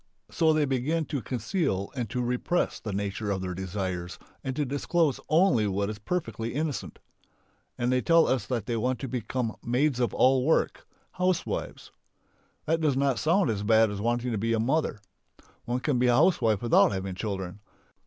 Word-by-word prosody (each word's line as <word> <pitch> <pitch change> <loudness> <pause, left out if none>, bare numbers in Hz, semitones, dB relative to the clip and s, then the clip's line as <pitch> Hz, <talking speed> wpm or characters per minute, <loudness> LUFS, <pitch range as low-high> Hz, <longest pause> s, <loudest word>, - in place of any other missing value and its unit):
So 160 -2 +3
they 155 -1 +2
begin 140 +5 0
to 140 -3 -3
conceal 115 - -2
and 120 -5 -3
to 125 +2 -2
repress 125 +8 -1
the 110 - -5
nature 100 +1 -3
of 95 -2 -1
their 90 -1 -3
desires 90 -2 -4 0.3
and 130 -1 -3
to 150 - 0
disclose 145 +2 0
only 155 - +4
what 100 +1 -1
is 105 - -8
perfectly 115 - -3
innocent. 150 -1 -3 0.8
And 120 +1 0
they 130 0 +2
tell 165 +2 +5
us 130 -5 0
they 120 -2 -2
want 125 +3 0
to 135 - -3
become 120 -1 -3
"maids 125 +2 +1
of 120 - +1
all 130 0 +4
work," 160 +4 +1 0.2
housewives. 180 -1 -2 0.7
That 165 +1 +1
does 145 -4 +2
not 135 -3 +1
sound 170 - +2
as 100 -2 -3
bad 110 0 +4
as 100 0 -5
wanting 120 +2 0
to 110 - -1
be 115 +2 +1
"mother." 135 +4 0 0.7
One 125 +1 -2
can 135 -4 0
be 125 - +3
a 120 - +4
housewife 120 - +3
without 120 - +5
having 95 -1 -3
children. 95 -1 -4
120 Hz, 175 wpm, -27 LUFS, 105-145 Hz, 0.8 s, tell